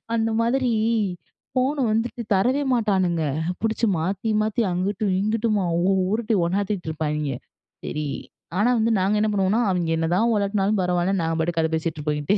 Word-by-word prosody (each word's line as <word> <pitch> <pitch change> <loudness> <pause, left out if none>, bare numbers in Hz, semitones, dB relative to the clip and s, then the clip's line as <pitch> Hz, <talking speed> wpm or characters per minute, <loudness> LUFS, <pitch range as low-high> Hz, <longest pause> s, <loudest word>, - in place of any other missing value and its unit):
அந்த 225 0 +1
மாதிரி, 250 +2 +1 0.9
ஃபோன 260 +3 +1
வந்துட்டு 230 +2 -1
தரவே 255 +9 +2
மாட்டானுங்க. 185 -7 +1 0.4
புடிச்சு 225 +1 0
மாத்தி 195 +6 -2
மாத்தி, 215 +2 0
அங்குட்டு, 190 +4 -1 0.2
இங்குட்டுமா, 215 -2 0 0.5
உருட்டி 225 0 0
ஒண்ணாத்திட்டு 195 -1 -2
இருப்பாய்ங்க. 150 -2 -2 0.5
சரி, 150 -1 -3 0.5
ஆனா 235 +4 +3
வந்து 225 +1 +2
நாங்க 195 +3 +1
என்ன 215 - +2
பண்ணுவோம்னா? 200 +4 +2
அவங்க 175 -2 -1
என்னதான் 180 +8 +1
உலட்டுனாலும் 200 0 +1
பரவால்ல. 180 +2 +1
நாங்க 165 0 -1
பாட்டுக்கு 165 0 0
கத 160 - +1
பேசிட்டு 155 -2 -2
இங்கிட்டு. 195 +8 +1
200 Hz, 140 wpm, -23 LUFS, 175-225 Hz, 0.9 s, ஆனா